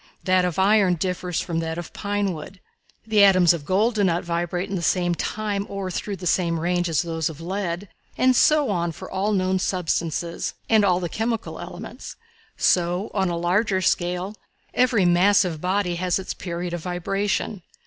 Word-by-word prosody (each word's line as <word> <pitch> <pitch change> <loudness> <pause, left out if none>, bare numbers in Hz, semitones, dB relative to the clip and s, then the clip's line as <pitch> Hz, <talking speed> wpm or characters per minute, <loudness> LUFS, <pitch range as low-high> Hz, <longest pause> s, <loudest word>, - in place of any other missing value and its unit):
That 185 -1 +3
of 175 -3 -2
iron 195 -1 +4
differs 180 0 -2
from 170 -3 -2
that 165 0 -3
of 175 -1 -7
pine 205 -2 -1
wood. 165 +4 -9 0.5
The 215 -2 +4
atoms 185 -3 +6
of 160 -4 -5
gold 210 +7 +2
do 210 -2 +1
not 175 -2 +1
vibrate 175 +1 -2
in 200 - -4
the 180 - -2
same 175 0 +1
time 205 +2 -2
or 195 -2 -4
through 200 +3 -3
the 185 - -9
same 170 -1 +1
range 175 +1 0
as 160 +1 +1
those 165 -2 -2
of 160 -2 -9
lead, 185 +1 -3 0.3
and 255 0 +4
so 295 -2 +4
on 170 -3 -1
for - - -10
all 200 +3 0
known 185 -1 +1
substances, 170 -2 -2
and 220 -2 +4
all 180 -3 +3
the 175 - -2
chemical 225 +5 -3
elements. - - -8 0.4
So, 180 +3 +1
on 190 -3 +1
a 170 - -2
larger 190 +3 +1
scale, 180 +1 0 0.4
every 245 -6 +3
massive 175 -2 +3
body 180 -1 0
has 180 -1 0
its 190 - -4
period 175 -1 -5
of 175 - -3
vibration. 195 +3 -2
185 Hz, 180 wpm, -23 LUFS, 175-200 Hz, 0.5 s, atoms